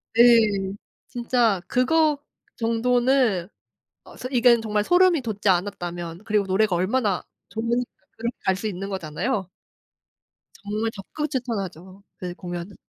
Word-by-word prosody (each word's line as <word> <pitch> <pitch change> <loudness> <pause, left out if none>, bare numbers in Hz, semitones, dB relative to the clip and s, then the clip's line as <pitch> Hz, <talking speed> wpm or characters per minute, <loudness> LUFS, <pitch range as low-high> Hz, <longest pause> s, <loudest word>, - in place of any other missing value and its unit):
예. 220 -5 +5 0.4
진짜 235 -5 +1
그거 300 +4 +3 0.4
정도는 235 -4 +2 0.6
어 - - -14
소 255 - -6
이건 240 -2 +5
정말 210 -1 0
소름이 355 -3 +4
돋지 210 -3 -2
않았다면 175 -1 -1
그리고 210 -2 +1
노래가 190 0 +2
얼마나 200 +1 +1 0.3
좋으니까 235 +4 -1 0.3
그렇게 235 +1 -3
갈 190 - +3
수 200 - -5
있는 195 0 -5
거잖아요. 190 - -2 1.1
정말 215 +2 -2
적극 300 +9 -5
추천하죠 195 - -4
그 180 -1 -5
공연은. 175 +1 -6
215 Hz, 275 characters per minute, -24 LUFS, 190-245 Hz, 1.1 s, 예